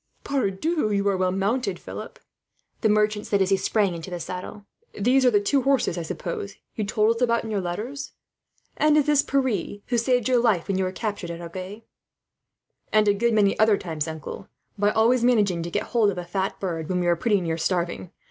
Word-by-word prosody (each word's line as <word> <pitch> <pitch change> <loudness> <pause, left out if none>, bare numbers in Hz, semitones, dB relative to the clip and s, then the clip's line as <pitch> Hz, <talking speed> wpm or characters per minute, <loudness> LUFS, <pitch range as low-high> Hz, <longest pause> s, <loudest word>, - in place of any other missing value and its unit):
"Pardieu, 275 - -1
but 300 - +2
you 200 -1 0
are 195 - +1
well 185 0 +1
mounted, 205 +7 -1
Philip," - - -8 0.6
the 220 - +3
merchant 210 0 +1
said, 200 - +1
as 190 0 +1
he - - +6
sprang 195 0 +1
into 165 +1 -7
the 175 -1 -5
saddle. 185 +4 -7 0.3
"These 255 +6 +3
are - - +8
the 210 -4 +3
two 270 +7 +1
horses, 270 -8 +1
I 175 - -3
suppose, 175 +4 -5 0.2
you 215 - -2
told 215 +2 +2
us 230 - -7
about 235 -1 +2
in 220 - -5
your 205 -2 0
letters. 220 +11 -5 0.6
"And 305 0 +4
is 295 - +3
this 295 -2 +4
Pierre, 255 - -1
who 240 -1 0
saved 245 -1 +1
your 255 -2 +3
life 220 -8 +2
when 190 -1 0
you 190 - +1
were 185 - -2
captured 205 -3 -4
at 170 0 -6
Agen?" 185 +5 -7 1.1
"And 215 -1 +4
a 205 - +5
good 230 +3 +1
many 200 -2 +3
other 215 -1 +5
times, 160 -4 -4
uncle, 160 -1 -7 0.3
by 205 0 +2
always 230 +3 +3
managing 205 -8 +3
to 170 - -4
get - - -1
hold 230 -4 +2
of 190 - -3
a 175 - -4
fat 190 +2 -2
pullet 165 -5 -3
when 180 -1 0
we 175 - -1
were 175 0 +3
pretty 205 +4 +1
near 165 -2 -2
starving. 175 0 -1
205 Hz, 220 wpm, -24 LUFS, 185-235 Hz, 1.1 s, are